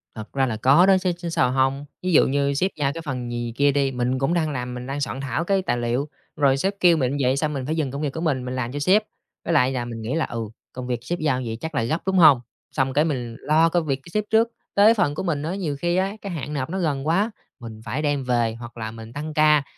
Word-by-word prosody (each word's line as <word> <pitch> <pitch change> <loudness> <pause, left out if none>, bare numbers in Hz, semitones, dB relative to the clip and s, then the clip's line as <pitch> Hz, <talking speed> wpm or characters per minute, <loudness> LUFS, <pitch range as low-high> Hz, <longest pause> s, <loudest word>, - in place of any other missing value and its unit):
Thật 110 -1 -9
ra 135 -1 +2
là 115 -4 -2
có 140 +10 +5
đó 195 -1 +5
chứ, 185 -1 0
chứ 175 -1 -5
sao 125 -6 +2
hông. 135 +2 +1 0.2
Ví 185 - 0
dụ - - +6
như 140 +1 +1
sếp 185 +8 0
giao 140 -2 0
cái 165 - -6
phần 125 -6 -4
gì 120 -1 -3
kia 145 0 +4
đi, 140 -1 +1
mình 125 +1 -1
cũng 135 +5 +1
đang 165 -3 +1
làm, 125 -2 -4
mình 125 0 -6
đang 140 +2 -3
soạn 135 -1 -3
thảo 135 +4 -2
cái 195 +2 +1
tài 120 -9 -1
liệu, 120 +4 -1 0.3
rồi 140 -2 +3
sếp 190 +8 0
kêu 175 -2 +5
mình 130 -4 0
như 145 - -2
vậy 130 +2 +2
xong 150 +1 0
mình 135 -3 -3
phải 155 +3 -1
dừng 150 -5 -1
công 140 +2 -5
việc 145 -3 -2
của 160 - -4
mình, 140 -7 0
mình 125 0 -4
làm 125 -1 -2
cho 145 - -4
sếp. 190 +9 +4 0.4
Với 170 - 0
lại 130 -5 +4
là 125 -2 -2
mình 115 -1 -6
nghĩ 110 +4 -3
là, 165 - +1
ừ, 115 - -5 0.3
công 125 0 -6
việc 125 -1 -1
sếp 175 +7 -3
giao 140 -5 0
như 120 - -4
vậy 110 - -4
chắc 160 -1 -5
là 135 - +1
gấp, 140 +9 -1
đúng 190 0 +1
hông? 150 -8 +7 0.3
Xong 135 -2 0
cái 150 +3 +3
mình 125 -7 -3
lo 160 +2 +3
công 170 -1 0
việc 140 -3 +1
của - - -13
sếp 210 - +1
trước, 225 +1 +4 0.3
tới 210 +3 +7
phần 150 -10 +1
của - - -3
mình 155 -6 -1
á 165 +4 -2
nhiều 170 -7 -2
khi 175 +2 0
á 190 +2 +1
cái 200 - -5
hạn 150 -3 -5
nộp 140 -1 -2
nó 190 +3 -3
gần 145 -5 -1
quá, 195 +8 +2 0.3
mình 110 -3 -9
phải 130 +6 -2
đem 145 -2 0
về 120 -3 +1
hoặc 120 0 -10
là 110 -1 -4
mình 115 0 -10
tăng 150 +3 -5
ca 150 -1 +4
140 Hz, 295 wpm, -23 LUFS, 125-165 Hz, 0.4 s, hông